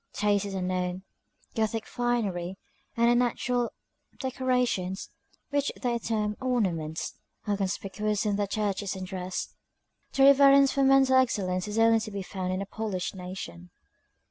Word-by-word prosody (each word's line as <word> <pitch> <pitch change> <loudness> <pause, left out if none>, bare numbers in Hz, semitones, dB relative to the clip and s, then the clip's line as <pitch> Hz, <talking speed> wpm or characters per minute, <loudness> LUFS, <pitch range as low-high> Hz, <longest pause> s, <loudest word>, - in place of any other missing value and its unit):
Taste 205 -1 +1
is 200 -1 -5
unknown; 180 0 -2 0.5
Gothic 220 0 -1
finery, 200 -7 -1 0.4
and 235 0 +4
unnatural 245 0 +1 0.5
decorations, 250 -8 -1 0.4
which 285 0 +1
they 240 -2 0
term 215 -2 -1
ornaments, 180 -11 -1 0.3
are 205 -2 +1
conspicuous 200 +2 -2
in 205 -1 +1
their 205 0 0
churches 200 -1 -1
and 190 -1 -5
dress. 185 -1 -4 0.6
Reverence 275 0 +7
for 275 - 0
mental 270 -1 +5
excellence 195 -7 +1
is 210 +1 -4
only 225 0 +5
to 220 - -5
be 200 -2 -5
found 185 -1 -4
in 185 +1 -1
a - - -7
polished 200 -3 -3
nation. 180 - -8
210 Hz, 135 wpm, -28 LUFS, 185-240 Hz, 0.6 s, Reverence